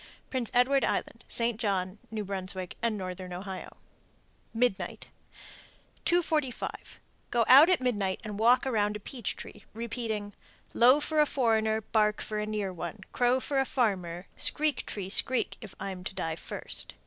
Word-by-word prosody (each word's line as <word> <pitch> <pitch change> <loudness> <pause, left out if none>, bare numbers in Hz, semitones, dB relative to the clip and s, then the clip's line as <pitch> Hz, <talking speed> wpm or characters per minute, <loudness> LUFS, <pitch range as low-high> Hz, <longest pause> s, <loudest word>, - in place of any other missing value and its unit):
Prince 255 -4 -1
Edward 265 +3 +3
Island, - - -2
St. 230 -1 +2
John, 195 -3 -1
N.B., 190 -3 -3
and 230 -2 0
Northern 185 -1 -6
Ohio. 190 +1 -7 0.7
MIDNIGHT. 230 -3 -1 1.0
245. 315 -7 -1 0.3
Go 235 -2 +2
out 280 +7 +9
at 365 - +4
midnight 205 -7 0
and 210 -1 -6
walk 240 +4 +5
around 210 -5 +1
a - - -4
peach 235 +1 -3
tree, - - -10
repeating, 225 -3 -3 0.4
Low 255 +5 +6
for 310 +1 0
a 300 - +4
foreigner, 220 -4 +2
Bark 210 -1 +1
for 215 -1 -3
a 210 - -2
near 210 -3 -2
one, 175 +4 -6
Crow 245 +1 +3
for 275 +1 -1
a 270 - +2
farmer, 185 -9 -1
Screek, 300 -3 +2
tree, 195 -2 -3
screek, 255 +4 +1
if 215 -3 -10
I'm 190 -2 -5
to 195 - -5
die 165 -4 -2
first. - - -7
220 Hz, 150 wpm, -29 LUFS, 195-250 Hz, 1.0 s, out